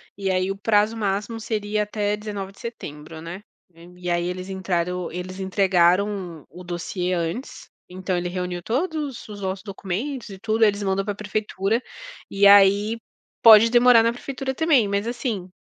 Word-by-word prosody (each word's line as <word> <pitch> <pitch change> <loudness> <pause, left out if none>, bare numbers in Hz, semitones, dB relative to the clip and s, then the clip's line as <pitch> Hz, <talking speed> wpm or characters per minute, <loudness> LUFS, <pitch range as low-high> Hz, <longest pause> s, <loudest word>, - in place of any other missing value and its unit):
E 195 -1 -3
aí 185 +1 +1
o 195 - -5
prazo 210 +2 +2
máximo 210 +1 -2
seria 210 -1 -2
até 210 0 -1
19 205 -2 -6
de 195 - -21
setembro, 160 -9 -8
né? 170 +4 -8 0.3
Nem 175 +1 -17
e 180 -1 -3
aí 175 0 +1
eles 185 +1 -5
entraram 180 -2 -2
eles 185 +2 -6
entregaram, 190 -2 +1
o 180 - -11
dossiê 180 +1 -3
antes, 170 - -4 0.2
então 185 0 -3
ele 175 0 -2
reuniu 180 -1 -4
todos 290 - -3
os 205 -1 -9
nossos 190 0 -3
documentos 210 +6 -5
e 195 - -9
tudo, 220 +2 0
eles 205 -1 +2
mandam 195 0 0
para 205 +1 -3
a - - -14
prefeitura 210 +1 -1 0.5
e 200 0 +2
aí, 205 +3 +6 0.4
pode 225 0 +8
demorar 240 -1 +6
na 230 +1 +2
prefeitura 265 +2 -5
também, 285 -8 +3
mas 200 +2 -1
assim, 235 -6 -3
200 Hz, 170 wpm, -23 LUFS, 180-220 Hz, 0.5 s, pode